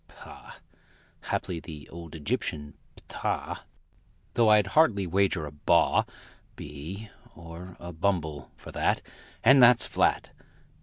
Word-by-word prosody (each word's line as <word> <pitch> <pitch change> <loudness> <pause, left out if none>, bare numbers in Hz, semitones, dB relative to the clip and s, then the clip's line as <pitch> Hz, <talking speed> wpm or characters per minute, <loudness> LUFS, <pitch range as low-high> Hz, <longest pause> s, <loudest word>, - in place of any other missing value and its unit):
Pah! - - -13 0.7
(Haply 90 -3 -2
the 75 -3 -10
old 85 -1 -10
Egyptian 75 -1 -3 0.2
ptah - - -4 0.7
Though 115 -2 +4
I'd 105 -1 +6
hardly 115 -12 +4
wager 95 -2 +1
a 75 - -7
baw 75 - +3 0.5
Bee 95 +9 -8 0.2
or 85 +2 -10
a 85 0 -8
bumble, 80 -4 -2
for - - -11
that - - 0 0.4
And 130 +4 +7
that's 120 0 +7
flat!).... - - +1
85 Hz, 115 wpm, -27 LUFS, 80-100 Hz, 0.7 s, And